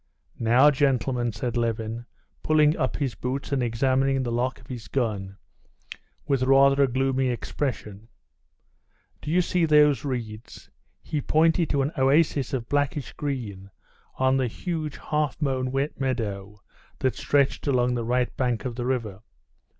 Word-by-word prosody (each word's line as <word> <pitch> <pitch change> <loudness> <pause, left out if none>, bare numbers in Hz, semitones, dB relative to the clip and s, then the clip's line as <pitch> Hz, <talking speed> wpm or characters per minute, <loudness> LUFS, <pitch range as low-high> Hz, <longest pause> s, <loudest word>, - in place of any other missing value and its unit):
"Now, 120 +6 +5
gentlemen," 130 -4 +1
said 115 +3 -4
Levin, 115 0 -2 0.3
pulling 155 0 +3
up 130 - -1
his 135 -5 -1
boots 135 +3 -4
and 140 -2 +1
examining 130 +3 +1
the 120 - -3
lock 125 +2 -1
of - - -17
his 125 -3 -8
gun 100 -7 -2 0.9
with 135 -2 +1
rather 135 +1 +5
a 140 - +5
gloomy 130 +1 0
expression, 110 - -4 1.1
"do - - -6
you 180 +3 +3
see 180 0 0
those 150 -2 +4
reeds?" 115 -5 -6 0.3
He 150 - -3
pointed 160 +3 +2
to 140 -2 +1
an 140 - -1
oasis 140 -1 +2
of 120 -3 -3
blackish 145 0 -1
green 110 -10 -5 0.5
in 130 0 +3
the 130 -2 +1
huge 155 +4 -4
half 150 -2 -2
mown 130 -3 -1
wet 135 +3 -2
meadow 105 -6 -3 0.4
that 130 - 0
stretched 140 0 0
along 125 -2 +2
the 120 -1 -2
right 125 +1 0
bank 125 -1 -1
of 125 - -2
the 120 0 -2
river. 115 -7 -2
130 Hz, 150 wpm, -25 LUFS, 120-140 Hz, 1.1 s, Now